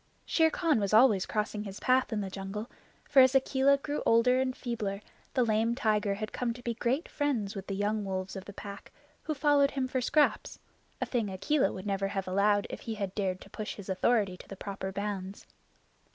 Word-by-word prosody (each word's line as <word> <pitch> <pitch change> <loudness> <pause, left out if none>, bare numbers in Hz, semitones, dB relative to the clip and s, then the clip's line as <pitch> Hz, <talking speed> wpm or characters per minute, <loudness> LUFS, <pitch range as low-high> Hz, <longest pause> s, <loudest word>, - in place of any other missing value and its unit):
Shere 320 -1 +3
Khan 320 -7 +1
was 200 +1 +1
always 220 -5 +5
crossing 210 0 -2
his 195 -1 -7
path 255 0 +2
in 215 -2 -1
the 195 -1 -5
jungle, 195 +4 -6 0.4
for 280 - +5
as 260 +1 +5
Akela 270 +1 +4
grew 290 +1 -3
older 250 +3 +4
and 255 -1 -2
feebler 215 -5 -3 0.4
the 255 - +4
lame 225 +1 +1
tiger 210 -5 +1
had 215 +1 -5
come 240 -2 -1
to 245 - -12
be 235 - -1
great 245 +6 -1
friends 245 -9 -1
with 195 -1 -6
the 195 - -3
younger 205 0 -1
wolves 185 0 -3
of 190 0 -7
the 205 - -8
Pack, 200 0 -9 0.3
who 310 - -3
followed 285 -1 +4
him 265 -2 -2
for 255 0 -1
scraps, 295 +4 +1 0.4
a - - 0
thing 230 -5 -1
Akela 270 +10 +1
would 190 +1 -7
never 195 -1 0
have 195 -1 -3
allowed 200 +2 +2
if - - -6
he 225 - -5
had 200 -3 -3
dared 190 -3 -2
to - - -13
push 215 - -5
his 200 -1 -10
authority 195 0 +2
to - - -13
the 195 - -8
proper 190 -1 -5
bounds. 200 -1 -5
215 Hz, 210 wpm, -30 LUFS, 195-255 Hz, 0.4 s, always